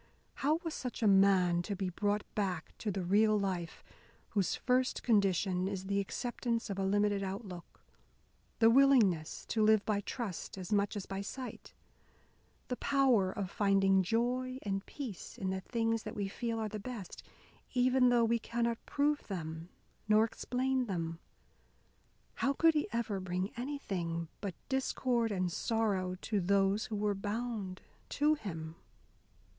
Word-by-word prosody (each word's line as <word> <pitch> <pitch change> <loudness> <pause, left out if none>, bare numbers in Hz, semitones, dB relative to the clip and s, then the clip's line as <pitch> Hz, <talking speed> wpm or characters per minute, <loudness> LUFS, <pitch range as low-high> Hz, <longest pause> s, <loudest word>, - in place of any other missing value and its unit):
How 295 +3 +3
was 330 -2 -3
such 250 -2 -4
a - - +5
man 190 -3 +5
to 200 +3 -3
be 190 -1 -2
brought 205 +3 0
back 185 -6 -2
to 215 - -2
the 195 -2 -2
real 210 +4 +4
life 180 -4 -3 0.5
whose 195 -4 +1
first 255 0 +1
condition 190 -4 +2
is 195 -1 -4
the 200 +1 0
acceptance 235 +2 -2
of 195 - -3
a - - 0
limited 205 +1 +2
outlook, 190 -2 -7 0.7
the 225 0 +6
willingness 230 - +4
to 220 - +1
live 215 -1 +5
by 205 -2 +1
trust 205 -4 -5
as 185 +2 -4
much 205 0 +1
as 205 - -4
by 195 0 -4
sight, 250 +5 -7 0.9
the 250 - -2
power 255 -9 +3
of 195 -1 -4
finding 195 -1 +3
joy 245 +6 0
and 195 -1 -2
peace 245 - -7
in 190 -1 -2
the 190 0 -3
things 225 +1 0
that - - -7
we 200 -2 -1
feel 230 +3 -3
are 220 -1 -1
the 215 0 -5
best, 210 -3 -7 0.5
even 250 0 +4
though 240 -1 +4
we 230 +1 +2
cannot 235 0 -2
prove 290 +1 +1
them 165 -3 -5 0.4
nor 215 +1 +5
explain 255 +2 -1
them? 165 -4 -3 1.2
How 275 - +3
could 325 +3 +4
he 300 -1 0
ever 230 -4 -1
bring 185 +1 -2
anything 190 - -3
but 195 -3 -4
discord 255 -3 0
and 185 -3 0
sorrow 195 -3 0
to 210 -2 0
those 200 +4 +2
who 220 - -4
were 205 0 +1
bound 205 -1 -4 0.3
to 300 +2 +3
him? 165 - -6
205 Hz, 155 wpm, -33 LUFS, 190-235 Hz, 1.2 s, the